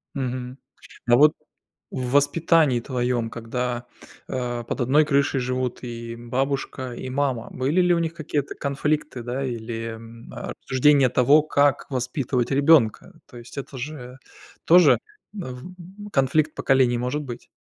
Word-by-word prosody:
Мгм. 130 -1 -4 0.5
А 120 - +6
вот 150 +3 +6 0.6
в 125 -1 -4
воспитании 145 -2 +3
твоём, 120 -2 -1
когда, 120 +1 -4 0.4
э, 120 -2 -3
под 125 - -4
одной 140 +5 +4
крышей 140 -2 +1
живут 125 0 -2
и 115 -1 -6
бабушка, 130 +1 -3
и 130 - -6
мама, 130 -3 -1
были 140 +8 +1
ли 180 -1 +4
у 170 - +1
них 165 -1 -1
какие-то 150 -3 -3
конфликты, 145 -2 -2
да, 125 +3 -3
или, 115 -2 -4
м, 115 +1 -12
э, - - -6
рассуждения 135 0 +4
того, 140 +5 +4
как 145 -2 +2
воспитывать 125 -1 -1
ребёнка? 140 -4 +3
То 120 - -15
есть 120 +4 -13
это 135 -1 -7
же 125 -1 -7 0.5
тоже 170 -2 +6 0.3
в 185 +5 -9
конфликт 150 +1 +1
поколений 130 -3 +2
может 125 +5 -2
быть. 125 -4 -9
130 Hz, 140 wpm, -24 LUFS, 120-145 Hz, 0.6 s, А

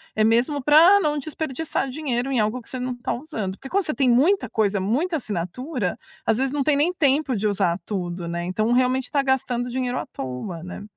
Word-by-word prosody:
É 215 - +2
mesmo 240 +6 +2
pra 330 +8 +7
não 300 -4 0
desperdiçar 310 -1 -3
dinheiro 265 -2 -2
em 255 - +1
algo 215 +4 0
que 230 - -15
você 255 - -5
não 250 0 -3
tá 245 - -3
usando. 240 - -4
Porque 270 +7 -11
quando 395 +5 +1
você 305 - -1
tem 270 -4 +2
muita 310 +12 +3
coisa, 205 -2 +1
muita 280 - 0
assinatura, 215 - -3 0.3
às 225 +1 +2
vezes 265 0 +1
não 285 -1 0
tem 295 +1 +3
nem 300 +5 +2
tempo 285 -5 +1
de 210 +1 0
usar 175 -4 +1
tudo, 175 -4 -4
né. 170 0 -3
Então 215 +6 0
realmente 255 +1 +1
tá 285 - +2
gastando 255 -2 0
dinheiro 250 0 -2
à - - -6
toa, 135 +7 -6
né. 180 +3 -8
250 Hz, 215 wpm, -23 LUFS, 215-290 Hz, 0.3 s, pra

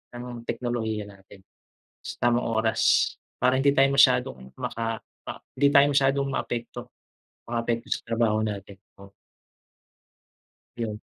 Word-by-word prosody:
ng 120 -1 -8
teknolohiya 110 -3 -2
natin. 95 0 -17 0.6
Sa - - -7
tamang 120 0 +2 0.2
oras. 110 0 +2 0.2
Para 130 +1 +3
hindi 140 +1 +3
tayo 135 -1 +4
masyadong 65 - +3
maka 115 -1 -3 0.3
ah, - - -7 0.2
hindi 140 +2 +3
tayo 140 0 +6
masyadong 140 0 +2
maapekto. 120 -2 -4 0.5
Makaapekto 115 +1 -2
sa - - 0
trabaho 115 -2 +1
natin, 100 -3 -5 0.2
oo. 100 0 -14 1.6
Yun. 110 -3 -4
115 Hz, 120 wpm, -26 LUFS, 110-125 Hz, 1.6 s, tayo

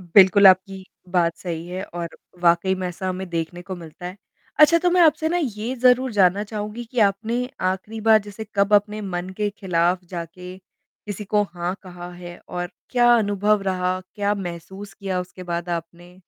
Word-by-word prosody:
बिल्कुल, 190 +3 +6
आपकी 190 0 +4 0.2
बात 175 -2 +1
सही 170 -2 -5
है 185 +2 -4
और 170 -3 -7 0.3
वाक़ई 175 +2 +4
में 185 -1 -3
ऐसा 180 +2 -4
हमें 185 0 -4
देखने 170 +1 -3
को 185 +1 -6
मिलता 170 +1 -10
है। 180 +2 -7 0.4
अच्छा, 305 +2 +7
तो 355 +1 +2
मैं 360 - +3
आपसे 315 -1 +4
ना 345 - 0
ये 230 -2 -3
ज़रूर 250 0 +4
जानना 195 +1 +3
चाहूँगी 215 +2 -5
कि 240 +2 -7
आपने 225 +5 +1 0.2
आखिरी 200 +4 -4
बार 220 0 +6
जैसे 210 +2 -8
कब 200 +1 +3
अपने 210 +1 +2
मन 180 -3 -4
के 210 -1 0
खिलाफ़ 180 -1 +1
जाके 180 +1 -7 0.5
किसी 210 0 -5
को 210 +1 +2
हाँ, 175 +1 -3
कहा 180 -2 -9
है 175 0 -10
और 175 0 -4 0.2
क्या 240 -1 +5
अनुभव 205 -1 +2
रहा, 185 -1 -1
क्या 205 -1 0
महसूस 190 +1 -7
किया 190 -3 -3
उसके 180 +1 -9
बाद 170 +1 -3
आपने? 175 +1 -6
190 Hz, 180 wpm, -23 LUFS, 175-210 Hz, 0.5 s, अच्छा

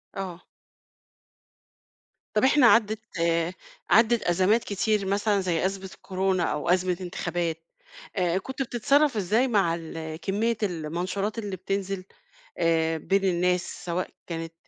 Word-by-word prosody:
آه. 185 -3 -6 1.9
طَب 210 - +2
إحنا 265 -1 +6
عدِّت، 220 -2 +4 0.2
آآ، 170 +1 +1 0.4
عدِّت 230 +1 +4
أزمات 190 +6 +3
كتير 205 0 0
مثلًا 200 +1 +1
زي 180 -2 0
أزمة 190 0 -3
الكورونا 190 -1 -1
أو 150 +3 -1
أزمة 180 0 +2
إنتخابات 175 -2 -3 0.5
آآ، 180 -2 +1
كنت 265 +8 -5
بتتصرّف 270 +2 +2
إزاي 215 +6 +2
مع 195 -8 +2
ال 160 -1 -6
كمّية 215 +6 0
المنشورات 180 +4 -2
اللي 205 -3 -4
بتنزل 195 +1 -3 0.5
آآ، 165 -1 +2
بين 195 +5 0
الناس 180 -1 0
سواء 175 +1 -2 0.2
كانت 165 -1 -5
190 Hz, 125 wpm, -26 LUFS, 170-210 Hz, 1.9 s, إحنا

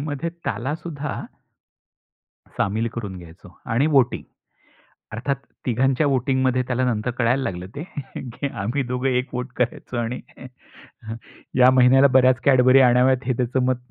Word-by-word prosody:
मध्ये 145 +3 -3 0.2
त्याला 135 +5 -2
सुद्धा 150 -4 -5 1.4
सामील 110 +4 0
करून 100 -5 -6
घ्यायचो 85 +2 -14 0.2
आणि 135 +7 +3
वोटिंग. 135 -5 +2 0.9
अर्थात 130 +5 -2 0.3
तिघांच्या 130 +4 +1
वोटिंगमध्ये 130 -1 +1
त्याला 130 0 0
नंतर 120 0 -1
कळायला 125 +2 +1
लागलं 90 -5 -4
ते 145 - -5 0.3
की 130 +3 -5
आम्ही 125 +7 -1
दोघं 125 +1 -2
एक 125 +1 -1
वोट 125 0 -4
करायचो 125 0 -2
आणि 120 +1 -2 1.4
या 125 0 +7
महिन्याला 130 +2 +6
बऱ्याच 130 -1 +5
Cadbury 130 0 +6
आणाव्यात 125 +2 +3
हे 130 - +2
त्याचं 125 +1 0
मत 130 0 +1
125 Hz, 135 wpm, -22 LUFS, 120-135 Hz, 1.4 s, या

